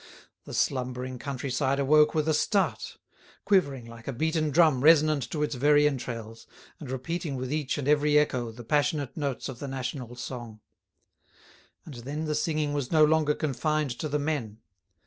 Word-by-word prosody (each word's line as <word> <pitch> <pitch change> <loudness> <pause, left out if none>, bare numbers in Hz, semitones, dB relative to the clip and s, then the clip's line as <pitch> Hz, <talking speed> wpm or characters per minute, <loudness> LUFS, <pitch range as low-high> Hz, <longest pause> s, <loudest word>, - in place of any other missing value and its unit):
The - - -9
slumbering 125 -1 -2
country 140 -1 -4
side 135 +1 0
awoke 150 +3 +4
with 155 0 +1
a 155 - +3
start—quivering 190 - -1
like 115 0 -12
a - - -1
beaten 155 +4 0
drum 155 -4 +4
resonant 150 -4 +4
to 150 -2 -2
its 150 0 -1
very 145 +3 +4
entrails, 115 -5 -5 0.3
and 145 - -8
repeating 150 +4 -3
with 130 +2 -4
each 150 -3 -1
and 145 -2 -3
every 150 0 +4
echo 125 -6 +1
the 120 +2 -11
passionate 145 +1 0
notes 140 -4 -3
of 130 -3 -8
the 140 - -5
national 130 -2 -5
song. 120 -3 -7 1.3
And 155 - -9
then 140 +6 -5
the 155 - -1
singing 150 -1 -1
was 140 -3 -3
no 155 -2 +6
longer 150 -1 +2
confined 150 0 -1
to 155 - -3
the 150 - 0
men. 140 -8 -3
145 Hz, 165 wpm, -27 LUFS, 125-155 Hz, 1.3 s, no